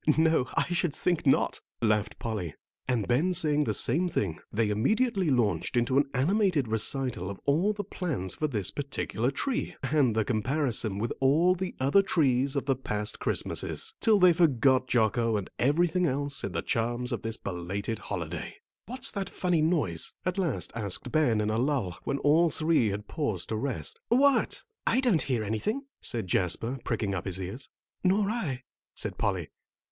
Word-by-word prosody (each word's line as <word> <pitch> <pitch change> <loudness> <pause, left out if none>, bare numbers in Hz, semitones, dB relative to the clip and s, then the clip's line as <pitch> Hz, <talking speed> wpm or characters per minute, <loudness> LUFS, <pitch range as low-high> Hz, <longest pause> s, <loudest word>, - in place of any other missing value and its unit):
"No, 160 -5 +3
I - - +3
should 170 -3 0
think 175 -4 0
not," 135 - +2 0.2
laughed 110 -2 +1
Polly. 105 -9 -4 0.3
And 120 -6 0
Ben 150 +10 +2
saying 150 -3 +2
the - - 0
same 180 +3 +1
thing 95 - -2
they 105 0 +1
immediately 195 - +1
launched 110 - +1
into 120 +2 +1
an 140 - +1
animated 170 - +2
recital 110 -2 0
of 100 - -7
all 165 +9 +3
the 205 -1 -4
plans 160 - -3
for 155 - -1
this 105 -10 -1
particular 135 -4 -2
tree, 245 - -2
and 135 -5 +2
the 110 -1 +1
comparison 120 -3 0
with 115 +3 -2
all 155 +7 +4
the 185 0 -4
other 140 +9 +4
trees 140 -7 +1
of 140 - -1
the 135 -1 +2
past 105 -4 -4
Christmases, 445 -1 -2
till 220 -3 +5
they 180 -2 +7
forgot 135 -6 +3
Jocko 115 -1 +2
and 100 - -5
everything 170 +6 +2
else 140 +1 -2
in - - -3
the - - -2
charms 120 +2 -1
of - - -2
this 115 0 -2
belated 100 +4 -4
holiday. - - -5 0.3
"What's 260 +3 +2
that 195 -2 -4
funny 180 -3 0
noise?" 150 - 0
at 185 +2 -1
last 170 -9 -1
asked 115 +3 -3
Ben 135 -9 +3
in 105 0 0
a 110 - 0
lull, 125 - -1
when 140 - -1
all 160 +4 +4
three 155 -5 +2
had 105 +1 -4
paused 110 - -2
to 110 - -1
rest. 115 - -3
"What? 275 +3 +3 0.2
I 235 - +3
don't 240 -11 +3
hear 125 -5 -1
anything," 160 - -2 0.2
said 115 -4 -2
Jasper, 95 +8 0
pricking 100 -3 -1
up 90 - -3
his 95 -1 -1
ears. 95 +9 -6 0.3
"Nor 195 +2 +2
I," 145 - -3 0.3
said - - -4
Polly. - - -1
135 Hz, 175 wpm, -28 LUFS, 110-170 Hz, 0.3 s, they